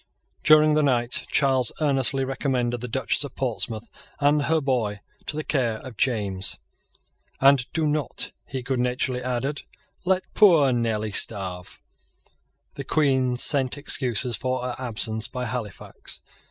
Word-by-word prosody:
During 155 Hz, 0 st, +6 dB
the 155 Hz, -, +3 dB
night 125 Hz, -4 st, +1 dB
Charles 130 Hz, -4 st, +2 dB
earnestly 135 Hz, -2 st, +1 dB
recommended 125 Hz, -3 st, -1 dB
the 125 Hz, -, -4 dB
Duchess 130 Hz, +3 st, 0 dB
of 140 Hz, -, -8 dB
Portsmouth 115 Hz, -3 st, -3 dB, 0.3 s
and 145 Hz, +1 st, +3 dB
her 160 Hz, +1 st, +2 dB
boy 120 Hz, -8 st, -1 dB, 0.3 s
to -, -, -3 dB
the 155 Hz, -, -2 dB
care 120 Hz, -8 st, 0 dB
of 130 Hz, 0 st, -10 dB
James; 100 Hz, -6 st, -1 dB, 0.8 s
"And 135 Hz, -2 st, +4 dB
do 160 Hz, -2 st, 0 dB
not," 150 Hz, -1 st, -2 dB, 0.2 s
he 130 Hz, -2 st, -5 dB
good 130 Hz, 0 st, -1 dB
naturedly 125 Hz, +1 st, -1 dB
added, 130 Hz, +3 st, -2 dB, 0.4 s
"let 185 Hz, 0 st, +1 dB
poor 165 Hz, -, +6 dB
Nelly 110 Hz, -3 st, -1 dB
starve." 95 Hz, -3 st, 0 dB, 0.9 s
The -, -, -6 dB
Queen 130 Hz, -4 st, +1 dB
sent 135 Hz, 0 st, +3 dB
excuses 125 Hz, -4 st, +1 dB
for 130 Hz, +4 st, -2 dB
her 125 Hz, -1 st, -3 dB
absence 110 Hz, -2 st, -1 dB
by 125 Hz, 0 st, -5 dB
Halifax. 115 Hz, -4 st, -6 dB
130 Hz, 140 wpm, -24 LUFS, 120-140 Hz, 0.9 s, During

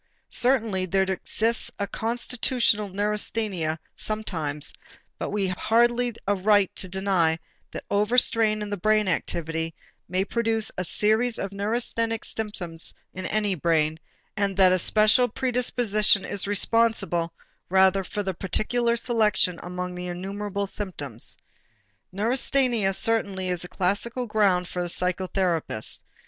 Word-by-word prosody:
Certainly 225 Hz, -7 st, +1 dB
there 190 Hz, +2 st, +2 dB
exists 215 Hz, +4 st, -1 dB
a 200 Hz, -, -1 dB
constitutional 230 Hz, -1 st, 0 dB
neurasthenia 205 Hz, -4 st, -1 dB, 0.2 s
sometimes 160 Hz, -9 st, -3 dB, 0.5 s
but -, -, -3 dB
we 205 Hz, -1 st, 0 dB
have 185 Hz, -1 st, -2 dB
hardly 240 Hz, +1 st, +2 dB
a 205 Hz, -, +2 dB
right 200 Hz, -1 st, +3 dB
to 185 Hz, -, 0 dB
deny 185 Hz, -4 st, +1 dB, 0.3 s
that -, -, -6 dB
overstrain 215 Hz, 0 st, +3 dB
in 205 Hz, -, -6 dB
the 205 Hz, -, -2 dB
brain 215 Hz, +2 st, +2 dB
activity 165 Hz, -2 st, -2 dB, 0.3 s
may 185 Hz, +2 st, 0 dB
produce 225 Hz, -1 st, 0 dB
a 185 Hz, -, -2 dB
series 220 Hz, +6 st, +1 dB
of 195 Hz, -, -4 dB
neurasthenic 225 Hz, +2 st, -1 dB
symptoms 180 Hz, -7 st, -4 dB, 0.2 s
in 185 Hz, 0 st, -5 dB
any 210 Hz, -2 st, 0 dB
brain, 160 Hz, -2 st, +1 dB, 0.4 s
and 200 Hz, -2 st, -1 dB
the 185 Hz, -1 st, +6 dB
special 215 Hz, +6 st, +5 dB
predisposition 235 Hz, -5 st, +2 dB
is 200 Hz, 0 st, -2 dB
responsible 205 Hz, -5 st, +2 dB, 0.4 s
rather 190 Hz, +1 st, +4 dB
for 205 Hz, +3 st, -4 dB
the 190 Hz, -1 st, -2 dB
particular 235 Hz, +6 st, 0 dB
selection 220 Hz, -7 st, +1 dB
among 180 Hz, 0 st, -5 dB
the 180 Hz, 0 st, -6 dB
innumerable 200 Hz, +3 st, -4 dB
symptoms. 160 Hz, -, -3 dB, 0.7 s
Neurasthenia 235 Hz, 0 st, +1 dB
certainly 195 Hz, -3 st, -1 dB
is 180 Hz, -2 st, -1 dB
the 180 Hz, -, -5 dB
classical 205 Hz, +8 st, -1 dB
ground 200 Hz, -5 st, +2 dB
for 180 Hz, -, -4 dB
the 175 Hz, -, -1 dB
psychotherapist. 180 Hz, -, -1 dB
200 Hz, 125 wpm, -25 LUFS, 180-220 Hz, 0.7 s, the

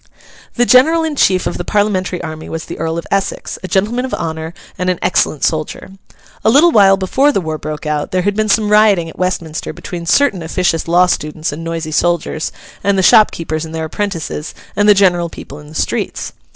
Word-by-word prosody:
The 245 Hz, -, +2 dB
general 285 Hz, +9 st, +5 dB
in 315 Hz, -2 st, -2 dB
chief 185 Hz, -8 st, +2 dB
of -, -, -3 dB
the -, -, -2 dB
Parliamentary 190 Hz, -3 st, -1 dB
army 155 Hz, -1 st, -7 dB
was 160 Hz, 0 st, -5 dB
the -, -, -8 dB
Earl 165 Hz, +1 st, -2 dB
of 170 Hz, -, -5 dB
Essex, 195 Hz, -1 st, -2 dB
a 185 Hz, -, -6 dB
gentleman 215 Hz, +7 st, 0 dB
of 260 Hz, -, -3 dB
honour 160 Hz, 0 st, -5 dB, 0.2 s
and 180 Hz, 0 st, -2 dB
an 180 Hz, -, 0 dB
excellent 150 Hz, -, +1 dB
soldier. 155 Hz, +4 st, -2 dB, 0.5 s
A -, -, +4 dB
little 295 Hz, +8 st, +5 dB
while 195 Hz, -6 st, +5 dB
before 265 Hz, +10 st, +2 dB
the 275 Hz, -, 0 dB
war 160 Hz, -3 st, -4 dB
broke 155 Hz, 0 st, -6 dB
out, 150 Hz, -1 st, -2 dB
there 185 Hz, -1 st, 0 dB
had 205 Hz, +1 st, 0 dB
been 215 Hz, 0 st, 0 dB
some 210 Hz, 0 st, +2 dB
rioting 210 Hz, -6 st, +4 dB
at -, -, -18 dB
Westminster 175 Hz, -3 st, -3 dB
between 170 Hz, -2 st, -7 dB
certain 225 Hz, -3 st, +2 dB
officious 165 Hz, 0 st, -1 dB
law 175 Hz, +2 st, +4 dB
students 155 Hz, -2 st, -2 dB
and 155 Hz, +3 st, -7 dB
noisy 165 Hz, -1 st, -4 dB
soldiers, 170 Hz, -1 st, 0 dB, 0.3 s
and 200 Hz, -1 st, +2 dB
the 190 Hz, -, +2 dB
shopkeepers 165 Hz, -6 st, +3 dB
and 160 Hz, 0 st, -7 dB
their 160 Hz, 0 st, -2 dB
apprentices, 165 Hz, -4 st, -4 dB, 0.2 s
and 205 Hz, +1 st, +3 dB
the 205 Hz, -, +7 dB
general 175 Hz, -3 st, +2 dB
people 145 Hz, -2 st, -10 dB
in 150 Hz, -, -13 dB
the 155 Hz, -, -13 dB
streets. -, -, -2 dB
180 Hz, 205 wpm, -16 LUFS, 160-205 Hz, 0.5 s, the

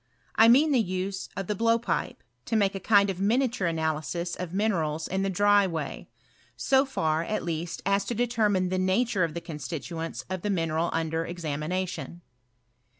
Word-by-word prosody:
I 225 Hz, -, +6 dB
mean 280 Hz, +7 st, +6 dB
the 255 Hz, -4 st, +4 dB
use 190 Hz, 0 st, -3 dB
of 195 Hz, -, -2 dB
the 210 Hz, -, -1 dB
blowpipe, 230 Hz, -5 st, 0 dB, 0.2 s
to -, -, -1 dB
make 200 Hz, -3 st, +3 dB
a. 195 Hz, -, -4 dB
kind 200 Hz, 0 st, +4 dB
of 185 Hz, -, -7 dB
miniature 230 Hz, -2 st, +1 dB
analysis 165 Hz, +2 st, -2 dB
of 180 Hz, -2 st, -5 dB
minerals 165 Hz, -6 st, 0 dB
in 190 Hz, +1 st, -1 dB
the 195 Hz, -, 0 dB
dry 205 Hz, +1 st, +4 dB
way; 160 Hz, -5 st, -5 dB, 0.6 s
aft 265 Hz, +1 st, +5 dB
far. 160 Hz, -7 st, +1 dB
at 215 Hz, +5 st, -2 dB
least, 170 Hz, 0 st, -4 dB
ta 200 Hz, +1 st, +3 dB
to 235 Hz, -, -4 dB
determine 215 Hz, -6 st, +1 dB
the 185 Hz, 0 st, 0 dB
nature 190 Hz, +2 st, +1 dB
of 165 Hz, -1 st, -2 dB
Uie 170 Hz, -, -6 dB
con 160 Hz, -3 st, -6 dB
stituents 165 Hz, +1 st, -5 dB
of 185 Hz, -1 st, -4 dB
the 210 Hz, -, -2 dB
mineral 165 Hz, -3 st, 0 dB
under 160 Hz, 0 st, -1 dB
examination. 170 Hz, +2 st, -4 dB
185 Hz, 175 wpm, -27 LUFS, 165-205 Hz, 0.6 s, I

